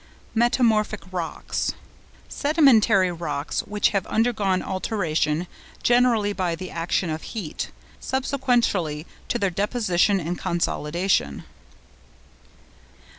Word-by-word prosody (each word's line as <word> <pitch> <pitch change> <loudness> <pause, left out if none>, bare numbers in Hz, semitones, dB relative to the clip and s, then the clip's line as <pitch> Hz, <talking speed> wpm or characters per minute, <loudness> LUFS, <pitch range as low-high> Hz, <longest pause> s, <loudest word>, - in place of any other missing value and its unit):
METAMORPHIC 225 -3 +2
ROCKS.—Sedimentary 215 - +1
rocks 150 -4 -3
which 210 0 +2
have 195 -3 -1
undergone 215 -5 +1
alteration, 170 -5 -1 0.4
generally 240 -4 +3
by 180 -4 -1
the 185 +2 -7
action 170 0 -1
of 155 +1 -3 0.2
heat, 175 -8 -4 0.3
subsequently 245 - 0 0.2
to - - 0
their 195 -5 0
deposition 200 -1 +1
and 175 +1 -3
consolidation. 170 - 0
195 Hz, 85 wpm, -24 LUFS, 170-230 Hz, 0.4 s, generally